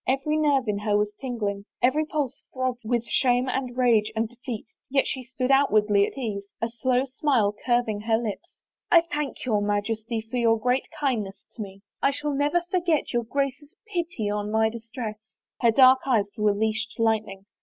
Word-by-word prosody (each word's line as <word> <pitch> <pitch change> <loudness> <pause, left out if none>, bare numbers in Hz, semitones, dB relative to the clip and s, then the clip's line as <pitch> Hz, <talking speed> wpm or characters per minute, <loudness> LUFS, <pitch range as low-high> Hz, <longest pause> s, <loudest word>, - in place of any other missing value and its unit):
Every 275 +4 +1
nerve 285 -5 +2
in 205 -1 0
her 205 0 +1
was 210 0 0
tingling, 210 -6 -3
every 260 +5 +3
pulse 285 -4 -2
throbbed 255 -2 -2
with 235 +1 0
shame 250 +1 +2
and 255 -1 -2
rage 225 -4 +3
and 220 +1 0
defeat, 245 -1 -7 0.2
yet 270 0 +2
she 260 - -3
stood 255 +1 -2
outwardly 215 -7 +4
at - - -10
ease, 215 -6 -3 0.2
a 230 - -1
slow 250 +2 +1
smile 260 -6 +1
curving 240 -4 +1
her 220 +1 +2
lips. 225 -3 -5 0.2
" - - -67 0.2
I 340 - +8
thank 300 -6 -4
your 215 -4 +1
Majesty 215 +2 -1
for 225 +3 -5
your 230 -1 +3
great 250 +3 0
kindness 230 -10 -2
to 230 - -6
me.... 195 -1 -8 0.2
I - - +4
shall 290 +1 -2
never 290 +5 +2
forget 345 -7 +1
your 240 -1 0
Grace's 280 +3 -3 0.2
pity 340 - -2
on 205 0 -2
my 220 +1 +3
dis 230 0 -10
tress." 220 -4 -7 0.2
Her 235 - +5
dark 260 +2 +7
eyes 210 -6 +2
were 210 -2 +2
leashed 220 +1 -1
lightning. 215 -4 0
235 Hz, 185 wpm, -25 LUFS, 215-270 Hz, 0.2 s, I